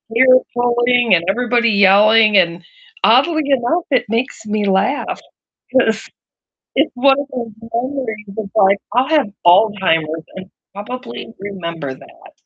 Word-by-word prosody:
hair-pulling 245 -3 +3
and 170 - -1
everybody 240 +1 +1
yelling, 210 +2 +4
and 175 -1 +1 0.4
oddly 315 -3 +3
enough, 275 +5 0
it 250 -3 +1
makes 230 -1 -3
me 210 -1 -2
laugh 195 +9 -1 0.5
'cause 225 -4 +1 0.7
it's 285 +3 +1
one 270 +2 +3
of 285 - -3
those 235 -3 -5 0.2
memories 235 -4 -4
that 200 0 -7
like, 200 -1 +3
I'll 250 +3 +1
have 300 -8 +2 0.2
Alzheimer's 175 -5 +2
and 190 0 -10 0.2
probably 235 +4 -8
remember 170 -8 -6
that. 130 - -16
225 Hz, 125 wpm, -17 LUFS, 195-250 Hz, 0.7 s, yelling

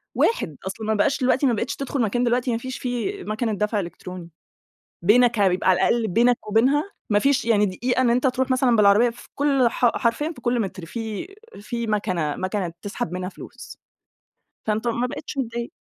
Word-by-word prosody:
واحد، 160 - +1
أصلًا 215 +3 -5
ما 220 - +2
بقاش 275 +8 +1
دلوقتي 260 +2 +2
ما 245 - +3
بقيتش 215 - -2
تدخل 275 -1 -3
مكان 240 +3 +1
دلوقتي 245 +1 +1
ما 230 - 0
فيش 260 +2 -6
فيه 255 - -3
مَكَنة 220 +1 -2
دفع 210 +1 0
إلكتروني. 175 0 -7 0.7
بينك 235 +3 +4
بيبقى- 190 -1 +2
على 185 - +5
الأقل- 230 -2 +2
بينك 235 +4 +2
وبينها، 275 - +2 0.2
ما 205 0 +4
فيش 275 -1 +2
يعني 210 -3 +3
دقيقة 245 +7 -1
إن 245 - +3
أنت 250 +3 +2
تروح 260 +1 0
مثلًا 255 -2 +3
بالعربيّة 210 +3 +5
في 240 +1 -12
كل 275 -3 +3
ح 245 - 0
حرفيًا 265 +6 0
في 245 - -13
كل 240 0 0
متر 185 -3 -5
في 220 - -5 0.3
في 235 +2 -4
مَكَنة، 185 -8 -1
مَكَنة 185 -3 -3
تسحب 205 -2 -4
منها 185 0 -3
فلوس، - - -11 0.9
فأنت 220 +2 0
ما 240 +2 0
بقيتش 275 +2 -7
متضايق. 235 -1 -3
235 Hz, 185 wpm, -23 LUFS, 205-250 Hz, 0.9 s, على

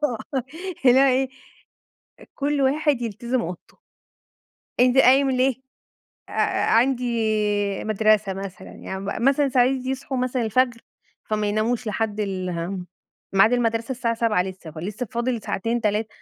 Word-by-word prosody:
آه، 255 0 -2 0.4
اللي 255 +1 +7
هو - - +6
إيه؟ 265 +1 +2 1.1
كل 285 0 0
واحد 280 -1 +2
يلتزم 235 +2 -2
أوضته. 175 +1 -8 1.0
أنت 250 +1 +4
قايم 265 +1 +6
ليه 260 0 +2 0.7
آآ - - -10
أ - - +1
عندي 245 0 +2 0.7
مدرسة 215 -2 +2
مثلًا 190 -1 -8
يعني 190 - -7
م 200 +3 -4
مثلًا 280 +1 +3
ساعات 250 -1 +4 0.2
يصحوا 265 0 -3
مثلًا 255 0 -1
الفجر، 235 +1 +1 0.4
فما 215 -1 -1
يناموش 220 +3 -1
لحد 215 0 -2
ال 190 -3 -2
اهم 180 +2 -4 0.5
ميعاد 195 +5 +5
المدرسة 230 0 0
الساعة 240 -2 -1
07:00 225 -5 +1
لسه 185 -3 -8
فلسه 195 +10 -5
فاضل 235 0 -1
ساعتين 230 +4 -2
3 210 0 0
230 Hz, 135 wpm, -23 LUFS, 205-255 Hz, 1.1 s, اللي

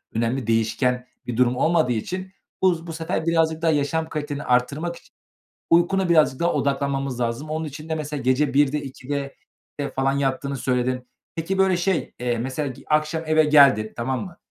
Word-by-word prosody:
önemli 115 +2 -1
değişken 125 +3 +1 0.2
bir 120 -1 -3
durum 125 0 +3
olmadığı 160 0 +2
için 185 - -3 0.3
bu 170 -3 +2
bu 165 - -5
sefer 160 0 -3
birazcık 160 -1 +1
daha 165 -1 +3
yaşam 160 +2 0
kaliteni 145 -2 -4
arttırmak 140 +8 0
için - - -19 0.6
uykuna 175 +2 +3
birazcık 155 -5 +3
daha 170 0 +2
odaklanmamız 140 -2 -1
lazım. 120 +6 -2
Onun 160 +1 -2
için 155 +1 -8
de 160 - 0
mesela 150 -2 -4
gece 130 +2 +1
01.00'de, 145 +1 +3
02.00'de, 140 +1 -5 0.4
eee, 145 - -2
falan 135 0 0
yattığını 140 0 -1
söyledin. 125 0 -1 0.3
Peki, 165 +4 -2
böyle, 190 -1 +4
şey, 175 0 -1
eee, 120 -1 0
mesela, 135 +4 -2
ge 130 - -10
akşam 155 +1 +1
eve 155 0 +4
geldin, 140 -8 +5
tamam 125 +2 -2
mı? 180 -3 -11
145 Hz, 175 wpm, -23 LUFS, 130-160 Hz, 0.6 s, geldin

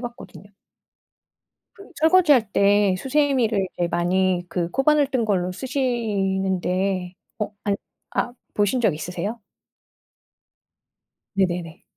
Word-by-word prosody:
봤거든요. 240 -4 -9 1.3
그 395 - -15
설거지할 310 - +4
때 200 -1 +3
수세미를 255 -6 +1
이제 175 -1 +1
많이 180 +1 +1
그 170 0 -2
코바늘 290 +1 +3
뜬 260 -4 0
걸로 185 -4 0
쓰시는데 195 -6 -1 0.3
어 210 - -2
안 200 - +2 0.4
아 245 - -1 0.2
보신 210 +5 +1
적 200 -8 +3
있으세요? 180 +8 -5 1.9
네네네. 175 -3 -1
200 Hz, 210 characters per minute, -23 LUFS, 185-250 Hz, 1.9 s, 설거지할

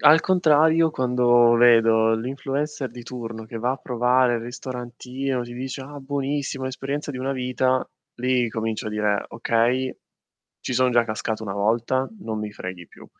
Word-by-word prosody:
Al 155 +2 +7
contrario, 160 -2 +4
quando 125 -3 +4
vedo 115 -2 +5
l'influencer 135 +3 -3
di 120 - -10
turno 115 -2 -7
che 115 +1 -7
va 120 +3 0
a - - -4
provare 125 -1 +2
il - - -4
ristorantino, 125 +2 -5
ti 120 - -9
dice: 130 +2 -5
"Ah, 145 +2 -9
buonissimo, 140 -1 -3
l'esperienza 135 +3 -4
di 130 - -6
una 135 +2 -2
vita." 130 0 0 0.3
Lì 125 -1 +1
comincio 110 -1 -3
a - - -1
dire: 105 -1 0
"Okay, 120 +3 0 0.7
ci - - -4
sono 130 +1 +3
già 120 -1 +4
cascato 110 0 -3
1 100 - -4
volta, 115 +6 0
non 110 -1 -4
mi 105 0 -4
freghi 90 -3 -7
più." - - -15
125 Hz, 165 wpm, -23 LUFS, 115-135 Hz, 0.7 s, Al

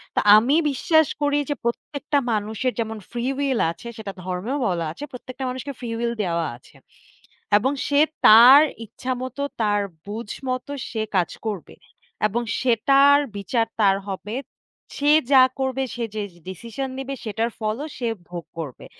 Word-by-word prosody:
তো - - +3 0.2
আমি 255 +7 +3 0.2
বিশ্বাস 315 +2 +3
করি 290 0 +2
যে 290 - 0
প্রত্যেকটা 285 +5 -2 0.2
মানুষের 220 +4 -1
যেমন 225 -1 -2
ফ্রি 240 0 -3
উইল 275 -4 0
আছে 235 - -11
সেটা 205 -3 -6
ধর্মেও 185 +10 -3
বলা 170 -3 -1
আছে। 230 - -9
প্রত্যেকটা 255 +1 -8
মানুষকে 260 +3 -5
ফ্রি 240 -2 -5
উইল 235 0 -1
দেওয়া 170 -2 -1
আছে। - - -22 0.8
এবং 260 +6 +1 0.2
সে 285 0 +3 0.3
তার 245 +6 +10 0.2
ইচ্ছামতো 255 +4 -4 0.2
তার 205 -1 +2 0.3
বুঝ 210 +1 -6 0.2
মতো 255 +2 -3 0.2
সে 220 -2 -2
কাজ 175 -3 +2 0.2
করবে। 205 -6 -5 0.5
এবং 235 +4 -2 0.2
সেটার 275 +4 +5 0.2
বিচার 225 +3 0 0.2
তার 195 -1 +5
হবে। 205 +4 -5 0.6
সে 290 +1 +3 0.2
যা 260 - +9 0.2
করবে, 265 0 -1
সে 240 - -3
যে 215 - -1 0.3
ডিসিশন 235 +8 -5
নিবে, 270 +1 -4
সেটার 225 +2 -1
ফলও 220 +7 -2
সে 240 - -2 0.2
ভোগ 175 -2 -6 0.2
করবে। 145 -6 -7
235 Hz, 150 wpm, -23 LUFS, 210-270 Hz, 0.8 s, তার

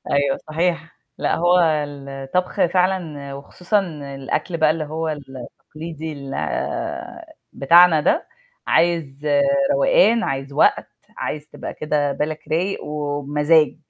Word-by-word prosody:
أيوه 140 -1 +2
صحيح، 165 0 -1 0.2
لأ - - +1
هو 175 +2 +4
الطبخ 145 +1 -1
فعلًا 175 -6 -1
وخصوصًا 180 +8 -1 0.3
الأكل 135 +5 -3
بقى 155 -1 +3
اللي 155 0 -1
هو 160 +2 -3
التقليدي 155 +3 -7
ال 140 -2 -7 1.2
بتاعنا 170 +3 +6
ده، 315 - +1 0.4
عايز 155 -4 +1 0.5
روقان، - - +4
عايز 135 0 -3
وقت، 145 - +3 0.3
عايز 150 0 -4
تبقى - - -7
كده 150 -2 0
بالك 150 +2 -3
رايق 175 +6 -1
وبمزاج. 150 +1 +1
155 Hz, 110 wpm, -21 LUFS, 140-170 Hz, 1.2 s, بتاعنا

